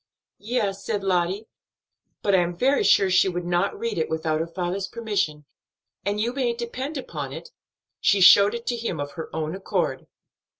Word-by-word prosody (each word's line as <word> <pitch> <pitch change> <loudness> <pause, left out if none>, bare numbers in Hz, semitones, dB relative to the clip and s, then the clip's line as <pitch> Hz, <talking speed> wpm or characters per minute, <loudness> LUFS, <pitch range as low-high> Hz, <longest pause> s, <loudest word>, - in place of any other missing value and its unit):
"Yes," 210 -3 -2
said 200 - -2
Lottie, 185 +2 0 0.8
"but 200 - +2
I 190 - +6
am 175 0 -1
very 270 +7 +3
sure 195 -1 +4
she 185 +1 +4
would 175 -1 -4
not 175 +3 0
read 225 -3 -2
it 160 - -1
without 160 -1 -1
her 165 - -2
father's 180 +3 -3
permission, 195 -10 -2 0.6
and 205 +1 -1
you 235 +3 0
may 255 -3 0
depend 255 +5 -5
upon 265 - -5
it, 480 - -9 0.5
she 200 - +3
showed 200 +4 +7
it 235 0 -6
to 245 - -1
him 225 -9 -3
of 145 0 -4
her 160 +2 -7
own 155 0 -3
accord." 190 0 -2
195 Hz, 180 wpm, -24 LUFS, 175-230 Hz, 0.8 s, showed